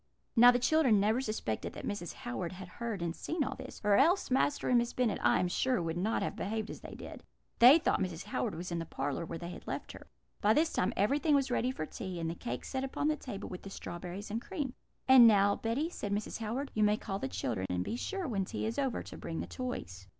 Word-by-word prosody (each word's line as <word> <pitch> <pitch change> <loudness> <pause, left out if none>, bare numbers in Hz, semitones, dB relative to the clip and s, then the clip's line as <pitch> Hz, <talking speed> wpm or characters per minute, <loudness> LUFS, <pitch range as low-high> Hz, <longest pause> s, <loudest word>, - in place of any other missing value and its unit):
"Now 240 +1 +9
the 245 - +5
children 250 -4 +4
never 215 +5 +2
suspected 215 - -3
that - - -7
Mrs. 190 -5 -4
Howard 120 +9 -5
had 185 0 -8
heard 220 -1 -4
and 170 0 -2
seen 325 -2 -2
all - - -3
this, - - -9
or 205 -1 +4
else 355 -3 +3
Master 275 +2 +2
and 245 -1 +5
Miss 235 0 -2
Bennet, 245 -4 +1
I - - +4
am 180 - +1
sure, 255 +7 +1
would 165 -1 -2
not 200 +6 0
have - - -3
behaved 220 +2 -3
as - - -9
they - - -9
did. - - -9 0.4
They 255 +6 +10
thought 335 - +1
Mrs. 180 -2 -3
Howard 210 0 -2
was 175 +2 -6
in 170 - -1
the 165 - -5
parlour, 145 +4 -3
where 165 - -5
they 170 +1 -6
had - - -10
left - - -4
her. - - -12 0.3
"By 210 +1 +4
this 320 +2 +2
time 180 - +1
everything 285 +8 +3
was 275 -2 +1
ready 245 +1 +1
for 255 -11 -3
tea, 180 +2 -6
and 165 0 -2
the - - -3
cake 125 -7 -5
set 265 0 -3
upon 270 +3 -1
the 310 - +2
table, 225 -8 -7
with 180 - -7
the 195 - -8
strawberries 185 +2 -7
and 225 +2 -2
cream. 290 -8 -4 0.3
"'And 260 -3 +9
now, 200 -2 +5
Betty,' 270 +9 -1
said 205 - -5
Mrs. 205 +2 -2
Howard, 240 +6 -3
'you 215 - 0
may 210 0 +4
call 195 -2 -4
the 135 - -2
children; 95 0 -2
and 90 0 0
be - - -3
sure, 380 +8 -3
when 200 -6 0
tea 185 - -4
is 225 +5 -2
over, 270 -4 -1
to - - -10
bring 165 - -4
the - - -3
toys.' 95 - -6
215 Hz, 255 wpm, -32 LUFS, 180-255 Hz, 0.4 s, They